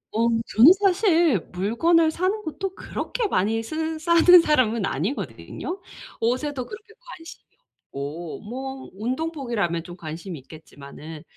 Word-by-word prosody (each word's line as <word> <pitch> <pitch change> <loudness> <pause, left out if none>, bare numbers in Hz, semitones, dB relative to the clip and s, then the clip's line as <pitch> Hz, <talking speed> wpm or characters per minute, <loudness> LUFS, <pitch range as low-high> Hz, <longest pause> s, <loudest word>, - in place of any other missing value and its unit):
어 230 +1 +3 0.2
저는 245 - +7
사실 350 - +3
물건을 315 - +2
사는 380 +6 -1
것도 380 +4 -5
그렇게 455 0 -3
많이 220 - 0
쓰는 315 +6 -3
사는 340 +2 +7
사람은 235 -9 +2
아니거든요. 195 - -4 0.4
옷에도 255 +2 -1
그렇게 430 +1 -11
관심이 - - -12 0.5
없고 150 +4 -6
뭐 265 +4 -7
운동복이라면 235 - -2
좀 175 0 -10
관심이 165 +1 -7
있겠지만은. 150 +2 -12
255 Hz, 295 characters per minute, -24 LUFS, -, 0.5 s, 저는